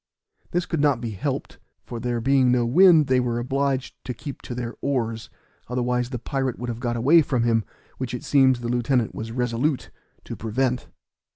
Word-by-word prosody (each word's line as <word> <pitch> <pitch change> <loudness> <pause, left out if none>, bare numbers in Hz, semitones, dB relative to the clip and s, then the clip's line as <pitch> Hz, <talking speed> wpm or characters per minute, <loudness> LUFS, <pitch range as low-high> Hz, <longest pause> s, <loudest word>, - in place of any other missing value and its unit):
This 175 +1 -1
could 165 - -2
not 145 -4 +3
be 115 -2 -4
helped, 100 - -4 0.2
for 120 - -7
there 120 0 -1
being 130 +1 +3
no 125 -1 +2
wind, 165 +4 +6
they 130 -1 +3
were 120 -1 -1
obliged 135 +1 -1
to 125 - -4
keep 140 +3 -8
to 120 - -6
their 120 -1 -4
oars, 115 -4 -2 0.4
otherwise 125 0 -1
the 125 - -3
pirate 130 +1 -2
would 120 0 -5
have 115 -1 -4
got 120 -1 -2
away 145 +8 +6
from 130 -5 0
him, 115 -2 +2 0.4
which 125 -2 -3
it 125 - -7
seems, 130 -3 +4
the 120 - -3
lieutenant 120 -1 +1
was 110 +1 -6
resolute 125 +4 -1 0.3
to - - -7
prevent. 125 +3 -1
125 Hz, 190 wpm, -24 LUFS, 120-135 Hz, 0.4 s, wind